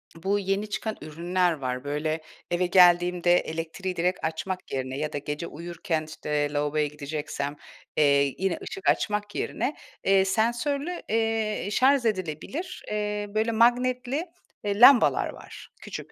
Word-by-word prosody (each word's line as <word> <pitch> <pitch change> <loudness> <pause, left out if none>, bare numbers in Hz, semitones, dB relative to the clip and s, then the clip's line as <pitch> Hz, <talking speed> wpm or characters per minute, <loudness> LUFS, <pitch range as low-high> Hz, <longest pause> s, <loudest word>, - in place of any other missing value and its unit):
bu 195 +5 0
yeni 195 +2 -1
çıkan 220 +1 -3
ürünler 175 +4 0
var, 130 -3 -4
böyle, 155 +2 -2 0.3
eve 175 +1 +2
geldiğimde 175 -1 +5
elektriği 165 +3 -4
direkt 180 +2 0
açmak 180 +4 -4
yerine 130 0 -3
ya 150 +1 -3
da - - -1
gece 150 +3 -4
uyurken, 170 0 -3
işte, 150 -1 -2
lavaboya 150 +1 +1
gideceksem, 145 -1 -4 0.4
eee, 140 -2 +4
yine 190 -2 0
ışık 195 - -2
açmak 210 -1 0
yerine, 290 - -2 0.3
eee, 195 0 +4
sensörlü, 260 - 0
eee, 225 -2 0
şarj 265 +3 +4
edilebilir, 190 - -3
eee, 210 0 -2
böyle, 220 +2 0
magnetli, 250 +6 +2 0.4
eee, 205 0 -1
lambalar 250 +1 +7
var - - -11
küçük. - - -8
180 Hz, 135 wpm, -26 LUFS, 155-215 Hz, 0.4 s, lambalar